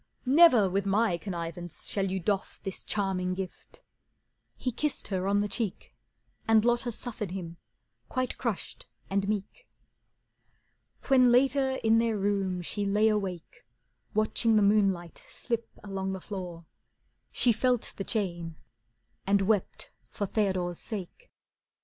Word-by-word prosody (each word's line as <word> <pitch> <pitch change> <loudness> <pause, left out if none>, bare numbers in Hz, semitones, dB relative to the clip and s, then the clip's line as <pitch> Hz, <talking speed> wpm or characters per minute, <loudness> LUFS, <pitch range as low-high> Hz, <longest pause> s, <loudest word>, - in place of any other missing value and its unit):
"Never 260 - +7
with 195 +2 -1
my 205 -1 +2
connivance 175 -2 -5
shall 195 -1 -1
you 190 +1 -1
doff 195 +2 -2
This 195 - -5
charming 185 -3 -1
gift." 190 -1 -8 0.7
He 255 - -2
kissed 295 +5 -1
her 190 -1 -1
on 200 +1 +3
the 205 - 0
cheek, 210 -1 -3 0.5
And 225 0 +5
Lotta 240 0 +2
suffered 215 -3 -4
him, 170 -2 -6 0.5
quite 255 -1 -2
crushed 230 -6 -4 0.2
and 195 0 0
meek. 215 - -4 1.4
When 255 -3 +5
later 265 +2 +3
in 225 0 +5
their 230 -2 +1
room 195 -3 0
she 205 +4 -2
lay 210 +2 +3
awake, 190 -5 -3 0.5
Watching 215 +1 +2
the 210 - +5
moonlight 195 -4 +1
slip 235 -2 -3
along 195 -1 -3
the 190 - -4
floor, 180 -4 -7 0.7
She 245 - +3
felt 245 +1 +1
the 195 - -3
chain 175 -7 -2 0.7
and 200 0 +3
wept 205 -1 0 0.2
for 205 - -3
Theodore's 185 -4 -1
sake. 215 - -6
200 Hz, 130 wpm, -29 LUFS, 190-225 Hz, 1.4 s, Never